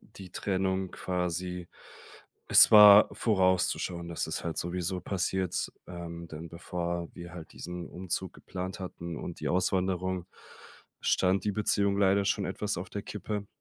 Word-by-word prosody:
die 95 -3 -13
Trennung 95 -1 -1
quasi 90 0 -3 0.8
es - - +8
war 105 0 +10
vorauszuschauen, 95 -4 +1
dass 85 - -2
es - - -4
halt 85 -1 -3
sowieso 90 +1 -2
passiert, 95 0 -1
ähm, 85 -1 -7
denn 80 +2 -8
bevor 85 0 -4
wir 85 -1 -9
halt 80 -3 -10
diesen 90 -1 -7
Umzug 95 0 -4
geplant 95 +1 -6
hatten 85 -2 -6
und 85 - -7
die - - -2
Auswanderung, 95 0 0 0.7
stand 95 0 +2
die 105 - 0
Beziehung 100 -1 +1
leider 100 0 +3
schon - - +1
etwas - - -2
auf - - -7
der - - -4
Kippe. 105 -2 -5
90 Hz, 140 wpm, -29 LUFS, 85-95 Hz, 0.8 s, war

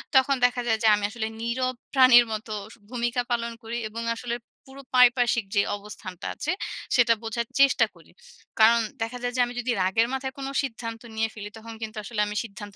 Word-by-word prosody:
তখন 265 +1 +5
দেখা 245 0 +1
যায়, 225 -1 +3
যে - - +5
আমি 205 - -4
আসলে 220 -1 -3
নীরব 255 +2 -1 0.2
প্রাণীর 255 -3 +8
মতো 215 +1 -5 0.2
স - - -15
ভূমিকা 240 0 -1
পালন 235 0 0
করি, 230 +1 -4
এবং 230 +2 -5
আসলে 235 0 -3 0.3
পুরো 270 +1 -12
পারিপার্শিক 245 -3 +5
যে 200 - +5 0.2
অবস্থানটা 200 -3 -8
আছে - - -2 0.4
সেটা 240 -2 +5
বোঝার 230 +1 -3
চেষ্টা 275 0 +5
করি। - - -19 0.5
কারণ 230 +2 +7 0.2
দেখা 225 +2 -2
যায়, 245 0 -1
যে - - +4
আমি 240 - -7
যদি 245 +1 -1
রাগের 190 +5 +2
মাথায় 265 0 -3
কোনো 270 0 -4
সিদ্ধান্ত 230 -3 -5
নিয়ে 225 0 0
ফেলি, 205 -1 -7
তখন 225 +1 -9
কিন্তু 220 0 -6
আসলে 215 0 -2
আমি 210 - -5
সিদ্ধান্ত 205 -2 -10
235 Hz, 195 wpm, -26 LUFS, 220-250 Hz, 0.5 s, প্রাণীর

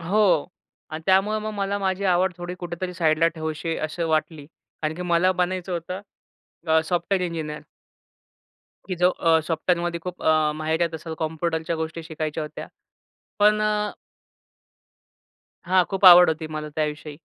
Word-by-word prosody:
हो 195 +6 +1 0.7
आणि 155 +1 -6
त्यामुळं 195 +3 +3
मग 215 - -3
मला 200 0 -1
माझी 190 0 -1
आवड 180 0 +2
थोडी 175 0 -6
कुठेतरी 175 +1 -5
साईडला 165 -1 +3
ठेवूशी 160 +1 -3
असं 165 +2 -3
वाटली, 155 -2 -1
कारण 160 0 -7
की 180 - -6
मला 175 +1 +2
बनायचं 180 0 -2
होतं 175 +2 -4 0.7
अ, 160 0 +4
सॉफ्टवेअर 180 +3 0
इंजिनिअर. 155 -3 -5 1.3
की 185 - -1
जो 180 +1 +4
अ, 165 -2 +2
सॉफ्टवेअरमध्ये 170 +1 -1
खूप 180 +1 -7
अ, 155 -1 +3
माहिरत 160 +2 -1
असेल, 160 0 -6
कॉम्प्युटरच्या 160 +1 -2
गोष्टी 160 +1 -4
शिकायच्या 155 -1 -4
होत्या. 150 +1 -7 0.7
पण 210 +1 +4
अ 210 0 0 1.8
हां, 185 -1 +4
खूप 195 +1 -3
आवड 180 0 +10
होती 160 0 -3
मला 155 -1 -5
त्याविषयी 150 -1 -3
170 Hz, 140 wpm, -24 LUFS, 160-185 Hz, 1.8 s, आवड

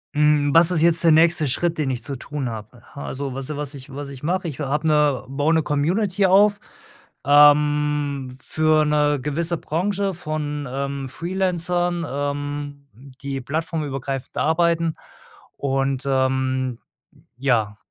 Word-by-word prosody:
Hm, 150 -1 +3
was 165 +1 +7
ist 165 -3 +2
jetzt 170 0 +4
der 165 - +6
nächste 160 0 +4
Schritt, 170 +6 -1
den 150 -3 -1
ich 125 -3 -3
zu 135 +2 -5
tun 140 0 -5
habe? 110 +2 -9
H 140 - -7
also, 135 0 -5
was 135 +1 -4
ich 150 - -3
was 145 -1 -5
ich 135 0 -11
was 145 0 -6
ich 135 -1 -11
mache. 180 +3 -1
Ich 145 - -9
habe 150 +2 -2
'ne 150 -4 +2
baue 145 +4 +1
'ne 160 -1 +2
Community 185 +8 0
auf, 200 +2 +4 0.7
ähm, 145 -2 +3
für 155 +1 +2
'ne 150 -1 +2
gewisse 160 +5 -1
Branche 195 +5 -2
von, 150 -4 -4
ähm, 140 +1 -4
Freelancern, 175 +2 -1
ähm, 145 0 -4 0.3
die 140 -1 -4
plattformübergreifend 140 -2 -4
arbeiten 165 0 +1 0.6
und, 135 -1 -1
ähm, 130 -2 0 0.6
ja, 115 -6 0
145 Hz, 145 wpm, -22 LUFS, 135-165 Hz, 0.7 s, was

